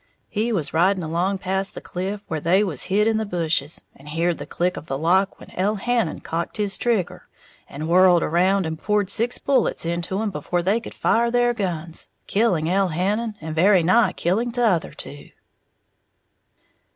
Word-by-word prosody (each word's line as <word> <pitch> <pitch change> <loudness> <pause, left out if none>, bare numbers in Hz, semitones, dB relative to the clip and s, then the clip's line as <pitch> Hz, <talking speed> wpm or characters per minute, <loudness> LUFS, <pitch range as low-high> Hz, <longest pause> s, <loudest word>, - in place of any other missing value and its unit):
He 225 +2 -1
was 160 -10 -2
riding 180 +3 +2
along 175 +5 0
past 190 +1 -2
the - - -5
cliff 195 +3 -5
where 160 - -2
they 180 +6 +3
was 170 -10 -3
hid 200 +3 +2
in 225 -1 +2
the 220 - 0
bushes, 165 -5 -1
and 140 +2 -13
heared 165 +2 0
the - - -7
click 180 +1 -1
of 155 - -8
the 135 - -2
lock 185 +6 +1
when - - -13
Elhannon 210 0 -1
cocked 170 +5 -4
his 205 -2 -1
trigger, 230 -7 -1 0.4
and 155 +3 -5
whirled 180 0 +5
around 185 +3 +2
and 160 0 -5
poured 205 -2 0
six 235 +4 0
bullets 275 -10 0
into 170 +3 -2
'em 220 -1 -1
before 175 -2 -2
they 200 +6 +2
could 235 - -10
fire 235 +1 +2
their 240 0 +2
guns, 170 -6 -4 0.2
killing 195 -7 +1
Elhannon 195 +5 0
and 160 0 -5
very 180 +2 +4
nigh 215 +7 +4
killing 220 +8 0
t'other 230 -8 +1
two." 145 - -10
185 Hz, 175 wpm, -23 LUFS, 170-210 Hz, 0.4 s, whirled